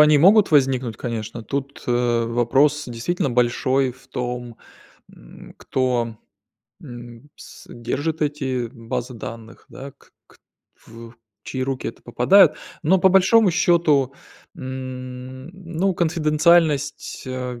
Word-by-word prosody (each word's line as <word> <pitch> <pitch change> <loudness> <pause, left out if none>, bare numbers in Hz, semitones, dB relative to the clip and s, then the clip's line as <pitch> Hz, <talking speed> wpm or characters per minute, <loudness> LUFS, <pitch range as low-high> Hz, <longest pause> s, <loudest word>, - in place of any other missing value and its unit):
они 150 0 +6
могут 200 +6 +5
возникнуть, 130 -6 +2
конечно. 115 -1 -5
Тут, 140 +3 -5
э, 120 -1 +1
вопрос 135 +6 +2
действительно 125 +6 -2
большой 125 +2 +1
в 130 +2 -22
том, 125 -2 -5 0.6
м, - - -15
кто, 120 -3 -1 0.6
м, 120 -2 -11
с - - -14
держит 145 +7 -3
эти 135 -5 -2
базы 125 +1 -5
данных, 115 0 -10
да, 135 +1 -10
к - - -25 0.2
к - - -23 0.5
в 115 +1 -12 0.3
чьи 130 +3 -4
руки 135 0 -3
это 115 - -11
попадают. 125 +12 +5 0.3
Но, 185 +5 +3
по 190 - +5
большому 195 +3 +5
счёту, 160 -6 +2 0.4
м, 130 +1 -7
ну, 185 +1 -2
конфиденциальность, 160 -2 +1
э, 125 -2 -5
130 Hz, 120 wpm, -22 LUFS, 120-150 Hz, 0.6 s, они